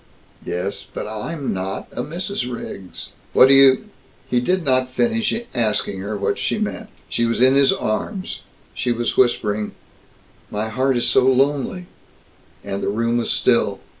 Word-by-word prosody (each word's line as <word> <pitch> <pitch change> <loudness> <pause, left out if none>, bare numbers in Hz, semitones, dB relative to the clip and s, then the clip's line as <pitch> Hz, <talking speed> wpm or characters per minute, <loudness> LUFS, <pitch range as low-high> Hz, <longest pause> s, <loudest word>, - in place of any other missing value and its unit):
"Yes, 90 +3 -3
but - - -5
I'm 120 +8 -4
not 95 +1 -4
a - - -4
Mrs. 165 -2 -3
Riggs!" 95 -6 -7 0.2
"What 130 - +7
do - - +8
you 135 -1 +6 0.2
" - - -32
He 125 - +3
did 180 +8 0
not 130 -2 +1
finish 225 - +1 0.2
asking 105 -4 0
her 100 +2 -4
what 100 - -1
she - - -1
meant. - - -4 0.2
She 115 - 0
was 115 - -1
in 130 +2 +6
his 140 0 +5
arms; 185 - -3 0.3
she 125 - -1
was 120 0 -1
whispering, 105 -4 +1 0.8
"My 105 +1 -3
heart 130 +3 +1
is 120 - +3
so 130 +1 +5
lonely;" 140 +6 +1 0.8
and 100 0 -4
the - - -1
room 115 +3 0
was 115 - -2
still. - - +2
125 Hz, 165 wpm, -21 LUFS, 110-135 Hz, 0.8 s, do